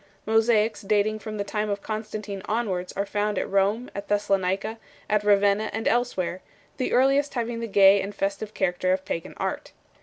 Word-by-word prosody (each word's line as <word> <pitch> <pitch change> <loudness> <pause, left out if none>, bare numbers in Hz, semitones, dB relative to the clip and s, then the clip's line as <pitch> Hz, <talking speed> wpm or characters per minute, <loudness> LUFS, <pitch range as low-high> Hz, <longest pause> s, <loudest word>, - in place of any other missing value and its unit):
Mosaics 220 0 +2
dating 210 +1 +1
from 215 0 -6
the 200 - -1
time 210 +1 -2
of 200 0 -3
Constantine 215 -2 -5
onwards 195 -5 -2
are 200 - -1
found 205 0 -1
at - - -1
Rome, 200 +5 +1
at 200 0 -6
Thessalonica, 200 +1 0 0.3
at 210 0 +1
Ravenna, 205 +1 +3
and 220 +2 -2
else 245 -1 +1
where; 185 0 -2 0.4
the 255 - -1
earliest 275 +3 +3
having 235 -1 -2
the 230 - -3
gay 195 -1 +6
and 200 +1 -6
festive 200 +2 -3
character 185 0 +1
of 190 0 -3
pagan 165 -2 -4
art. - - -4
205 Hz, 180 wpm, -25 LUFS, 195-220 Hz, 0.4 s, gay